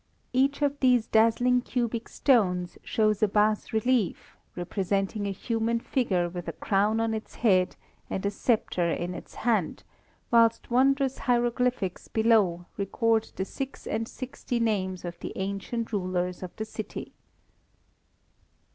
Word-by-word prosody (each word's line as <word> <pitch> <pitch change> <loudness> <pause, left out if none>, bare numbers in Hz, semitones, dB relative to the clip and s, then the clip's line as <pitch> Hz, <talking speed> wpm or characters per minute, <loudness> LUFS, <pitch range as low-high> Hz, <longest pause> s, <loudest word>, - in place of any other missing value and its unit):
Each 275 +3 +2
of 285 0 0
these 250 -3 +4
dazzling 235 +3 +3
cubic 235 -2 -2
stones 180 -9 +2
shows 215 -3 +1
a 215 - +5
bas 210 +1 +1
relief 225 -2 0 0.2
representing 195 +3 -1
a - - -1
human 230 +3 -1
figure 195 -9 0
with 175 0 -7
a - - -3
crown 210 +2 +1
on 225 0 0
its 220 0 -6
head, 185 -6 +3 0.3
and 190 - -3
a 200 - +1
sceptre 200 -5 0
in 175 +2 -2
its - - -10
hand, 215 -9 0 0.5
whilst 230 0 +3
wondrous 270 +1 +3
hieroglyphics 240 -5 0
below 215 -6 +2
record 225 +3 +1
the 190 - -2
six 270 +6 -6
and 225 +1 -2
sixty 255 -1 -4
names 190 -5 -1
of 175 0 -6
the - - -6
ancient 200 +4 -3
rulers 180 -2 -1
of 185 - -5
the 220 - -4
city. 215 0 -7
220 Hz, 140 wpm, -27 LUFS, 190-240 Hz, 0.5 s, a